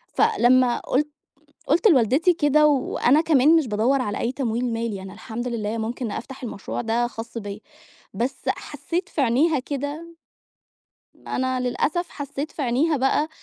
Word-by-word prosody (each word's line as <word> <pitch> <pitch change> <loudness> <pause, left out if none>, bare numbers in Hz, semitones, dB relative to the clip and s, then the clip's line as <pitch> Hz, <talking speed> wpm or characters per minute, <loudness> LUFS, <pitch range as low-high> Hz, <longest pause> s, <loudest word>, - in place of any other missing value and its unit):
فلما 255 - +3
قُلت 295 +3 0 0.6
قُلت 340 +8 +4
لوالدتي 280 - +4
كده 300 -1 +4
وأنا 280 0 +2
كمان 310 0 +4
مش 315 - +2
بادوّر 235 +6 +1
على 205 -3 -3
أي 240 - -1
تمويل 245 -2 -1
مالي، 225 -4 -3
أنا 190 0 -9
الحمد 230 +3 -5
لله 225 -1 -3
ممكن 225 +1 -3
أفتح 265 +3 -7
المشروع 205 -4 -5
ده 235 +1 0
خاص 230 0 -7
بيّا. 205 -1 -7 0.5
بس 260 +3 -1
حسّيت 320 +5 -3
في 295 - -2
عينيها 275 +5 +3
كده 290 +5 -5 1.1
أنا 260 0 -1
للأسف 295 +8 -1
حسّيت 285 +1 -5
في 295 - -4
عينيها 280 +6 +1
بقى 270 +4 +1
255 Hz, 145 wpm, -23 LUFS, 235-295 Hz, 1.1 s, قُلت